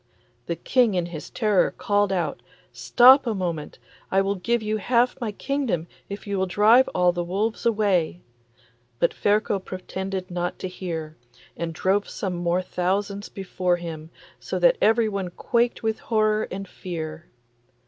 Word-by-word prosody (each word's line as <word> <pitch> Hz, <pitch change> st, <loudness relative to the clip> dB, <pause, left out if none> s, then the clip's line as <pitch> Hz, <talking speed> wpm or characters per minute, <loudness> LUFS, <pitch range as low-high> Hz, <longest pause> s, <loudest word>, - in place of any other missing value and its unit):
The 170 Hz, -, -1 dB
King 240 Hz, +1 st, +2 dB
in 175 Hz, -1 st, 0 dB
his 170 Hz, -3 st, -8 dB
terror 210 Hz, -5 st, +2 dB
called 205 Hz, -1 st, 0 dB
out, 170 Hz, -6 st, -1 dB, 0.3 s
'Stop 260 Hz, +2 st, +6 dB
a 225 Hz, -, 0 dB
moment; 170 Hz, -5 st, -4 dB, 0.3 s
I 195 Hz, -, +3 dB
will 195 Hz, +1 st, +1 dB
give 230 Hz, +4 st, -1 dB
you 215 Hz, 0 st, -1 dB
half 240 Hz, +4 st, +2 dB
my 225 Hz, -3 st, -2 dB
kingdom 245 Hz, -, -2 dB, 0.2 s
if 200 Hz, +1 st, -7 dB
you 200 Hz, -2 st, -2 dB
will 190 Hz, -, +1 dB
drive 220 Hz, +7 st, +5 dB
all 180 Hz, -1 st, +4 dB
the 175 Hz, 0 st, -3 dB
wolves 210 Hz, +7 st, -1 dB
away.' 200 Hz, -7 st, +1 dB, 0.8 s
But -, -, +2 dB
Ferko 205 Hz, -1 st, +1 dB
pretended 190 Hz, 0 st, -5 dB
not 175 Hz, 0 st, -2 dB
to -, -, -4 dB
hear, 165 Hz, -4 st, -6 dB, 0.4 s
and 170 Hz, -1 st, -3 dB
drove 190 Hz, +5 st, 0 dB
some 190 Hz, -3 st, -3 dB
more 175 Hz, +1 st, 0 dB
thousands 200 Hz, +3 st, -2 dB
before 185 Hz, -2 st, -1 dB
him, 165 Hz, -2 st, -7 dB, 0.3 s
so -, -, -4 dB
that -, -, +4 dB
everyone 215 Hz, -4 st, +2 dB
quaked 235 Hz, +7 st, 0 dB
with 220 Hz, 0 st, -1 dB
horror 215 Hz, -1 st, +1 dB
and 195 Hz, +1 st, -6 dB
fear. 160 Hz, -3 st, -7 dB
195 Hz, 155 wpm, -24 LUFS, 175-215 Hz, 0.8 s, Stop